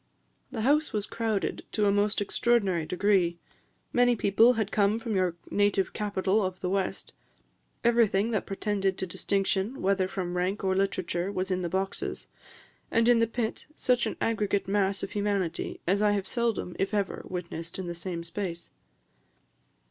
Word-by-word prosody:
The 225 - -3
house 295 +4 +2
was 210 -2 0
crowded 220 -3 -2
to 210 - +2
a 200 - +4
most 205 +1 +2
extraordinary 200 -6 +1
degree; 180 -3 +2 0.6
many 245 0 +4
people 225 +3 +5
had 220 -3 -1
come 205 +1 +3
from 230 -2 -3
your 185 -3 +1 0.2
native 205 -1 +2
capital 205 0 0
of 185 -1 -3
the 180 - -2
west; 195 -1 -2 0.7
everything 230 -2 +3
that 215 - -1
pretended 195 -1 -1
to - - -2
distinction, 195 +5 -1
whether 190 -1 +2
from 185 -2 -4
rank 185 +4 -1
or 190 -1 +1
literature, 185 -1 -1
was 190 -1 -2
in 185 0 0
the 175 - -2
boxes; 190 +2 -3 0.6
and 230 0 +3
in 240 -1 +6
the 230 - +3
pit, 225 0 -3
such 250 -5 +2
an - - -4
aggregate 205 -3 0
mass 195 0 +1
of 195 - -4
humanity 200 -5 -2
as 195 +4 +2
I 210 -1 +4
have 195 -2 -1
seldom, 230 -7 -1
if 195 +2 0
ever, 200 -2 -1
witnessed 170 -2 -5
in 190 - -4
the 175 - -4
same 170 0 -5
space." 170 -1 -5
200 Hz, 165 wpm, -28 LUFS, 185-215 Hz, 0.7 s, in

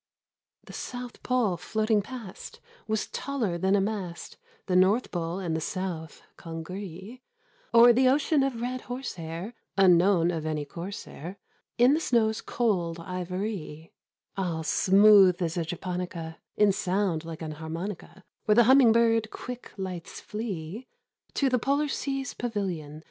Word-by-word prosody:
The - - -12
South 245 -1 -7
Pole 240 -8 +1
floating 215 +4 +1
past 225 -4 -9
50 470 - -26 0.2
Was 220 -1 0
taller 230 -11 -2
than 190 +3 +3
a 200 - +3
mast 195 -4 -4 0.2
— 465 - -32
The 185 - 0
North 195 +7 +3
Pole 170 0 -2
and 175 -4 -2
the 160 - -2
South 170 -3 -4
congree 185 +7 -7 0.5
O'er 235 +1 +8
the 255 +2 +4
ocean 285 +2 +3
of 265 -4 -1
red 250 +1 -3
horsehair 195 -6 -6 0.2
(Unknown 180 -2 +5
of 160 -3 -3
any 155 -2 -2
corsair) 175 +2 -7 0.4
In 245 +3 +6
the 310 - +2
snow's 220 -7 +1
cold 175 -8 -1
ivory 180 -2 -5 0.2
— - - -57
All 170 -4 -2
smooth 195 +1 +6
as 170 -1 -1
a 170 - 0
japonica, 175 -1 -5 0.2
In 210 -1 +5
sound 190 -3 0
like 165 -1 -7
an 155 - -4
harmonica, 165 +5 -6 0.2
Where 210 - +4
the 240 - +7
humming 260 0 +7
bird 225 -1 +3
quick 250 +2 -8
lights 185 -3 -6
flee 210 +1 -5 0.5
To 275 - +2
the 255 -1 +2
polar 280 +5 +1
sea's 270 -1 -3
pavilion. 185 -10 -4
195 Hz, 150 wpm, -27 LUFS, 170-235 Hz, 0.5 s, O'er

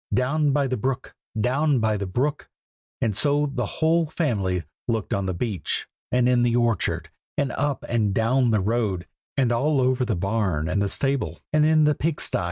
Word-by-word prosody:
"Down 145 +3 +2
by 140 0 +2
the 130 -1 -1
brook! 130 +4 -3 0.3
down 135 +5 +2
by 110 -2 +1
the 100 -1 -3
brook!" 140 +10 -1 0.5
and 110 -4 +1
so 145 +3 +2
the 120 -5 -1
whole 160 +4 +1
family 100 - -1 0.2
looked 115 -4 -1
on 100 -1 -1
the 95 - -1
beach, 105 0 -2 0.2
and 125 -1 +3
in 125 -1 +3
the 120 -1 +2
orchard, 120 -5 0 0.3
and 140 -3 +1
up 145 +1 -2
and 110 -4 +1
down 120 +5 +2
the 110 -3 +2
road, 100 -4 0 0.3
and 130 -3 +2
all 140 +5 +2
over 130 0 +2
the 120 -4 0
barn 95 -4 0
and 100 +4 0
the 100 - +1
stable, 130 - -1 0.2
and 155 0 +4
in 155 0 +4
the 150 0 +4
pig 155 +2 -1
sty. - - 0
120 Hz, 190 wpm, -24 LUFS, 105-140 Hz, 0.5 s, and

